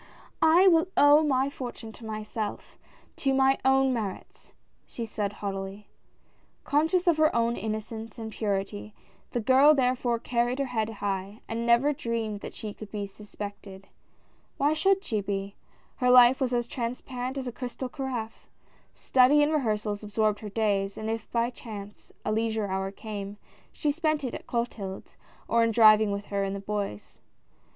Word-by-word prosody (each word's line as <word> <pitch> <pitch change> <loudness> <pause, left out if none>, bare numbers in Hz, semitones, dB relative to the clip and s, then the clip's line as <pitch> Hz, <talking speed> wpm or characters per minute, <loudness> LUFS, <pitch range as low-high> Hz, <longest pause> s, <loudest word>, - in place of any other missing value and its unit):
"I 330 +4 +6
will 330 -1 +5
owe 290 +1 +7
my 275 -2 +1
fortune 240 -4 -7
to 225 - -12
myself 215 0 -5 0.2
— - - -31
to 270 -1 +1
my 270 0 +3
own 265 0 +4
merits," 210 -6 -6 0.4
she 235 - -5
said, 210 -2 -3
haughtily. 195 0 -6 0.7
Conscious 320 +5 +2
of 340 -3 +4
her 310 0 +3
own 235 0 +2
innocence 220 0 -5
and 220 -1 -6
purit}", 205 0 -3 0.4
the 240 - -2
girl 265 +6 +6
therefore 250 -2 +1
carried 240 +1 0
her 275 - 0
head 225 -4 -1
high, 200 -1 -4
and 230 +1 -3
never 240 +5 +4
dreamed 230 -5 -3
that - - -9
she 210 -2 -6
could 215 0 -10
be 205 -2 -3
suspected. 200 -1 -9 0.7
Why 290 +2 +2
should 385 +5 +2
she 215 - -1
be? 195 0 -4 0.4
Her 250 - +2
life 250 +1 +7
was 255 -2 +1
as 240 -1 +1
transparent 250 +2 -4
as 260 -1 -4
a - - -3
crystal 250 +2 -5
carafe. 250 -4 -5 0.5
Study 265 +3 +4
and 300 +2 +1
rehearsals 215 -7 -1
absorbed 210 0 0
her 210 - -7
days, 200 -2 0
and 220 0 -3
if 225 -1 -5
by 235 +1 +1
chance 210 -4 -10
a - - 0
leism 220 -1 0
e - - -6
hour 190 0 -1
came, 205 0 -7 0.3
she 295 - 0
spent 310 -1 0
it 255 - -3
at - - -8
Clotilde's, 225 -5 -4 0.3
or 230 0 +3
in 230 - +3
driving 215 -2 +6
with 200 0 -3
her 200 -1 -1
in 195 0 -2
the 200 - -4
Bois. 200 - -5
230 Hz, 170 wpm, -27 LUFS, 210-260 Hz, 0.7 s, owe